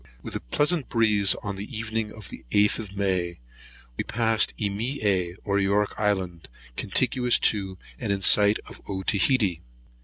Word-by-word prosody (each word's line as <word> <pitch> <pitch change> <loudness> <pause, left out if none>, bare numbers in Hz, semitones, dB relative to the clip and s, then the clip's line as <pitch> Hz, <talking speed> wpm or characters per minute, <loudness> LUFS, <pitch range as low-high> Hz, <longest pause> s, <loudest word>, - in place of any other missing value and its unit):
WITH - - -6
a - - -1
pleasant 145 - 0
breeze, 105 -4 +3
on 100 -2 -4
the 105 +4 -7
evening 110 -1 -3
of 105 -3 -10
the - - -10
8th 105 +5 +3
of 100 -3 -8
May, 90 -3 -1 0.7
passed 115 -1 +2
Emea 100 -4 -1
or 100 -1 0
York 100 +1 +1
Island, 95 -5 -2 0.3
contiguous 125 - +2 0.2
to, 95 -3 -5 0.2
and 115 -5 -2
in 100 -1 -1
sight 105 +2 +5
of - - -11
Otaheite. 100 - +1
105 Hz, 145 wpm, -25 LUFS, 95-110 Hz, 0.7 s, sight